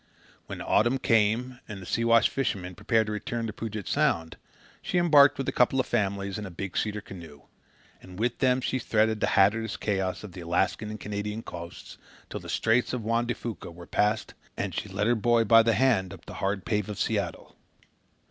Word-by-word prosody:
When - - -6
autumn 120 +5 +2
came 120 +1 +1
and 105 -3 -7
the 95 - -10
Siwash 115 +3 +3
fishermen 95 -9 -2
prepared 110 +4 +1
to 105 - -4
return 115 +2 -3
to 110 - -4
Puget 110 -3 -5
Sound, 80 -1 +1 0.5
she 180 - -2
embarked 150 -5 +6
with 135 - -3
a - - +1
couple 125 +2 +2
of 130 - +2
families 100 -3 -1
in 105 - -5
a - - -7
big 90 +2 -6
cedar 105 -1 -1
canoe; 85 -8 -11 0.6
and 90 -1 -12
with 120 +3 -1
them 130 -1 +3
she 130 - -1
threaded 110 -1 +1
the - - +1
hazardous 110 +3 +3
chaos 95 -2 -2
of 105 - -8
the 90 0 -9
Alaskan 85 +5 0
and 110 0 -6
Canadian 105 +2 -4
coasts, 85 +1 -9 0.3
till - - -4
the - - -11
Straits 115 +3 +1
of 125 -3 -3
Juan 115 +2 0
de 120 - -1
Fuca 115 -6 -6
were 85 +1 -11
passed 105 +4 0 0.2
and - - -3
she 105 - -4
led 100 +2 -1
her 120 - +4
boy 120 0 +3
by 115 +1 +7
the 115 -1 +2
hand 100 -6 +2
up 90 - -19
the - - -9
hard 95 -1 -1
pave 105 -3 -1
of 105 - -5
Seattle. - - -2
105 Hz, 205 wpm, -27 LUFS, 95-115 Hz, 0.6 s, by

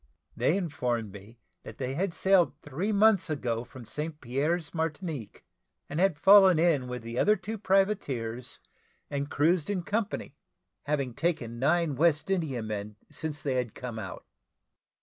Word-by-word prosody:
They 170 - +2
informed 125 - -2
me 100 +4 -13 0.2
that 110 - -10
they 130 -1 -3
had 175 +4 -1
sailed 185 -6 +3
three 160 +9 -2
months 210 -3 +4
ago 120 -6 -2
from 125 0 -12
St. 150 +6 -5
Pierre's, 145 +6 -1
Martinique, 160 - -4 0.4
and 150 - -4
had 190 -4 +3
fallen 190 0 +7
in 155 -6 +2
with 125 -1 -5
the 115 0 -7
two 120 - -1
other 210 +1 +4 0.2
privateers, 145 - 0 0.5
and 140 0 -2
cruised 160 +4 +2
in 190 -4 -1
company, 210 -7 -2 0.5
having 140 -4 -1
taken 120 -7 -2
nine 155 +2 +2
West 160 +3 +2
Indiamen 110 - -2 0.2
since 150 -2 -5
they 140 - 0
had 125 -4 -2
come 120 -3 -6
out. 95 -3 -7
145 Hz, 150 wpm, -29 LUFS, 125-175 Hz, 0.5 s, fallen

